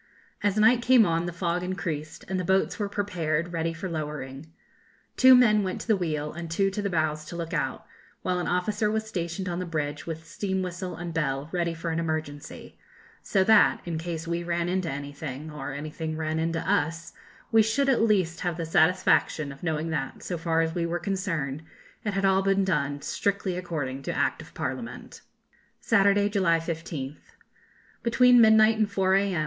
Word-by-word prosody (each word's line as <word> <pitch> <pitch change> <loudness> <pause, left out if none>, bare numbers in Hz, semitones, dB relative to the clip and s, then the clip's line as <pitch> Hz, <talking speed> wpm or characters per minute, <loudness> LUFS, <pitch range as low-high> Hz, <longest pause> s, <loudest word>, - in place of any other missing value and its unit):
As 205 -1 +1
night 225 +3 +5
came 245 -2 +6
on 165 0 0
the - - -3
fog 175 0 -1
increased, 165 -4 -4
and 190 0 -2
the - - -1
boats 190 +5 +1
were 205 -1 -1
prepared 175 -5 -2
ready 165 0 -1
for 165 +3 -5
lowering. 150 -2 -5 0.6
Two 260 0 +8
men 215 -4 +5
went 185 -2 -3
to - - -9
the 220 - +4
wheel, 155 -5 -2
and 170 0 -6
two 195 +4 +1
to 205 - -3
the 200 - -1
bows 155 -3 0
to 170 - -8
look 170 -1 -5
out, - - -2 0.4
while 180 -1 0
an 175 - -2
officer 210 +4 0
was 220 +1 -1
stationed 185 -3 -4
on 175 0 -2
the 185 - -3
bridge 150 -2 -3
with 160 -1 -5
steam 190 +3 -2
whistle 180 0 -5
and 170 0 -6
bell 140 -2 -1
ready 170 -2 -1
for 165 +1 -4
an 160 - -1
emergency; 155 -3 -5 0.4
so 195 -3 +2
that, 220 +1 +5
in 165 -2 -3
case 165 0 -5
we 170 0 -1
ran 170 0 -1
into 180 -1 -1
anything, 145 +1 -6
or 145 -2 -6
anything 155 +2 -5
ran 160 0 -1
into 165 0 -1
us, 165 +3 0 0.4
we 225 - +6
should 225 +6 +1
at 265 -4 +3
least 190 -7 +2
have 175 -2 -2
the 165 - -3
satisfaction 160 -2 +2
of 140 - -12
knowing 160 -1 -2
that, 145 -4 -4
so 180 - -3
far 165 0 +1
as 160 0 -1
we 170 - -1
were 170 +1 -1
concerned, 170 -7 -2 0.4
it 210 -3 -2
had 195 0 +1
all 190 0 +4
been 195 0 +2
done 145 -5 -1
strictly 200 -2 -1
according 150 -7 -4
to - - -3
Act - - 0
of - - -15
Parliament. - - -5 0.6
Saturday, 200 -2 +3
July 190 -5 +2
15th. 160 -4 -5 0.8
Between 245 +1 +5
midnight 220 0 +6
and 215 -1 +2
4 190 -1 +2
a.m. 195 -3 +2
170 Hz, 190 wpm, -27 LUFS, 160-195 Hz, 0.8 s, Two